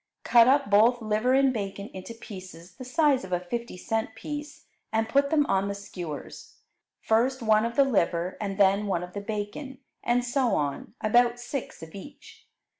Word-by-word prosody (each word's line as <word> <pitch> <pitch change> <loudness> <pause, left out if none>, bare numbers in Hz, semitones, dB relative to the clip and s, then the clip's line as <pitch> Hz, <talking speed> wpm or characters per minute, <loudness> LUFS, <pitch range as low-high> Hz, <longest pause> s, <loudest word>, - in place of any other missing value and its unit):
Cut 235 -1 +6
up 275 +1 +4
both 230 +4 +5
liver 220 +3 +1
and 270 -1 +4
bacon 200 -2 -5
into 190 +5 -8
pieces 185 -5 -11
the - - -9
size 280 - +2
of 190 - -9
a 180 - +1
fifty 235 +3 -5
cent 220 +3 -2
piece 295 +4 -7 0.3
and 220 0 +1
put 280 +4 +2
them 295 -1 +3
on 195 -4 +1
the 200 - -3
skewers, 175 -6 -8 0.5
first 245 +3 +1
one 215 0 +4
of 235 - -7
the 280 - +5
liver 180 -7 0
and 195 -2 -3
then 200 +1 +3
one 180 -3 -1
of 180 0 -9
the 200 - -4
bacon, 215 +6 -5 0.3
and 245 +1 +1
so 250 0 +1
on, 145 - -3
about 240 +2 +3
six 240 - -6
of 160 - -11
each. 200 +9 -12
220 Hz, 185 wpm, -27 LUFS, 195-250 Hz, 0.5 s, Cut